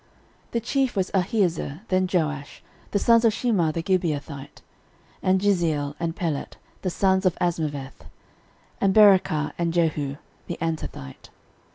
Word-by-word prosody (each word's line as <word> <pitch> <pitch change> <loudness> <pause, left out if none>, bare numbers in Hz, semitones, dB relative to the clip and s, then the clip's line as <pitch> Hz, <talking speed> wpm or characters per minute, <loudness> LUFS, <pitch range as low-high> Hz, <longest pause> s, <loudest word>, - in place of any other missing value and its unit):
13:012:003 - - -36
The 235 - +1
chief 260 +1 0
was 190 -2 -1
Ahiezer, 180 - 0
then 185 0 +2
Joash, 150 -5 -2 0.3
the - - 0
sons 230 +3 +4
of 225 -2 +4
Shemaah 205 -9 +1
the 165 +1 -3
Gibeathite; 150 -6 -2 0.6
and 185 0 +3
Jeziel, 165 -8 +1
and 165 -1 -2
Pelet, 160 -5 -3 0.2
the 185 - -1
sons 190 +1 +2
of 180 - +1
Azmaveth; 150 -6 -3 0.8
and 195 -1 +2
Berachah, 190 -8 +5
and 170 -1 +1
Jehu 155 -5 0 0.3
the 175 - -4
Antothite. 160 - -5
175 Hz, 140 wpm, -24 LUFS, 155-195 Hz, 0.8 s, Berachah